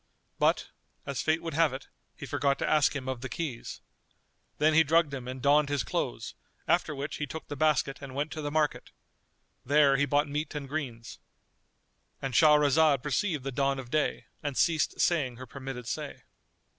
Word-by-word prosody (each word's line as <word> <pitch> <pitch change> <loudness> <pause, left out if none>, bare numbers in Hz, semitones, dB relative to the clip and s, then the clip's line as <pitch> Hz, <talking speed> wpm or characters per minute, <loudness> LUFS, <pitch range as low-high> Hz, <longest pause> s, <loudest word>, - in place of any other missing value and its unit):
But, - - +2 0.3
as 140 -3 -3
fate 160 +1 +1
would 165 - -4
have 160 -2 +3
it, 135 - -7 0.3
he - - -8
forgot 140 -1 0
to - - -2
ask 150 -1 +3
him 130 -2 -4
of 130 -2 -3
the 130 - -5
keys. 145 -9 -5 0.8
Then 155 +1 +3
he 160 +1 +6
drugged 160 -1 +2
him 130 -2 -5
and 130 0 -6
donned 145 0 +4
his 145 -4 0
clothes; - - -3 0.3
after 155 - +1
which 140 +2 -4
he 150 - -3
took 160 +4 -7
the 145 - -5
basket 145 -2 +1
and 135 -2 -8
went 145 +2 -2
to 155 - -5
the 145 - -3
market. 150 0 0 0.7
There 140 0 +4
he 145 +1 +2
bought 145 +2 +2
meat 150 +2 -4
and 145 -2 -4
greens.——And 130 -1 -9
Shahrazad 150 0 +5
perceived 150 0 -1
the 135 - -3
dawn 135 +1 0
of 125 -2 -8
day 155 -1 0 0.2
and 145 -3 -4
ceased 160 -2 +1
saying 140 -8 +1
her 130 +2 -9
permitted 130 -1 -7
say. - - -5
145 Hz, 180 wpm, -29 LUFS, 135-155 Hz, 0.8 s, he